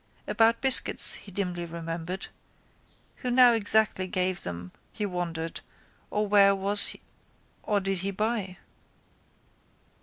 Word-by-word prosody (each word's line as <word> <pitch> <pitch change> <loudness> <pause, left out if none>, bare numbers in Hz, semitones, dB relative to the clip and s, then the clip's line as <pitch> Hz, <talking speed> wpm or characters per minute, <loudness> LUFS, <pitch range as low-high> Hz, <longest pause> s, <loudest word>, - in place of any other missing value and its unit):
About 230 0 +1
biscuits 265 -1 +4
he 200 - -8
dimly 180 -2 -5
remembered. 170 +2 -7 0.9
Who 250 - -5
now 245 -1 +5
exactly 215 -3 0
gave 185 0 -2
them 90 +1 -8 0.2
he 210 - -5
wondered 170 -3 -6 0.5
or 210 0 -3
where 200 -1 +3
was 200 +1 +7 0.7
or 205 -1 -1
did 195 -1 -4
he 195 +2 -4
buy. 200 -2 -4
195 Hz, 115 wpm, -25 LUFS, 175-210 Hz, 0.9 s, was